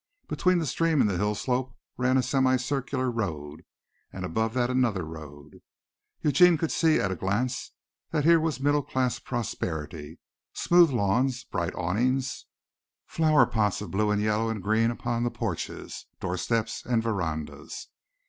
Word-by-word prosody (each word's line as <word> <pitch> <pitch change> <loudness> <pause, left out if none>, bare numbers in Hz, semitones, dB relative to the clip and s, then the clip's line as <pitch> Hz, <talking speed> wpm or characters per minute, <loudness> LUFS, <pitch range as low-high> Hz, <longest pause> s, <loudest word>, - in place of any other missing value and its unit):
Between 180 -1 +2
the 165 - 0
stream 160 +3 +1
and - - +4
the 95 -3 -1
hill 105 +1 +1
slope 125 +2 -2 0.2
ran 130 +1 +2
a 130 - +2
semi 130 -1 +2
circular 130 0 -2
road 80 -10 -4 0.5
and 95 -1 -5
above 110 +6 -1
that 125 0 +1
another 115 -9 +1
road. 75 -2 -11 0.6
Eugene 175 +3 +5
could 160 +1 -1
see 160 -2 +3
at 100 - 0
a - - -1
glance 105 +8 -2 0.4
that 155 -3 0
here 165 +1 +6
was 155 -5 -1
middle 145 +2 +2
class 130 -2 -1
prosperity, 80 -7 -4 0.4
smooth 175 -1 +5
lawns, 125 +2 +1
bright 85 -1 -3
awnings, 125 +9 -1 0.6
flower 155 -2 +4
pots 105 -3 0
of 105 - -7
blue 105 +2 +1
and 105 0 +1
yellow 110 +1 +1
and 110 -4 -4
green 110 +3 +2
upon 120 0 -2
the 120 - +1
porches, - - -5
doorsteps 110 +5 -2
and 115 -2 0
verandas. 85 -9 -4
115 Hz, 155 wpm, -27 LUFS, 95-130 Hz, 0.6 s, here